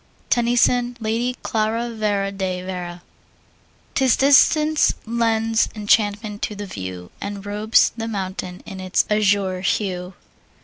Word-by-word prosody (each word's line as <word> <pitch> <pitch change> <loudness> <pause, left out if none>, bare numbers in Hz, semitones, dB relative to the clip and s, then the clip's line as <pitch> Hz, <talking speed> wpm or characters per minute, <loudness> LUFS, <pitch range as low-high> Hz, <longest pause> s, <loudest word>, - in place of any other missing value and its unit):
TENNYSON, 245 0 +2
Lady 235 +3 -1
Clara 225 +2 -1
Vere 205 -3 -1
de 185 -2 -3
Vere. 180 -1 -6 0.9
'Tis 265 -3 +3
distance 300 +3 +4
lends 225 -1 +1
enchantment 210 0 +1
to 210 - -3
the 205 0 -6
view 95 - -7
And 200 -1 -5
robes 210 +2 +3
the 225 -1 -4
mountain 190 -3 -5
in 195 -2 -8
its 185 0 +1
azure 200 -3 +2
hue. 185 -2 -2
210 Hz, 120 wpm, -21 LUFS, 190-230 Hz, 0.9 s, distance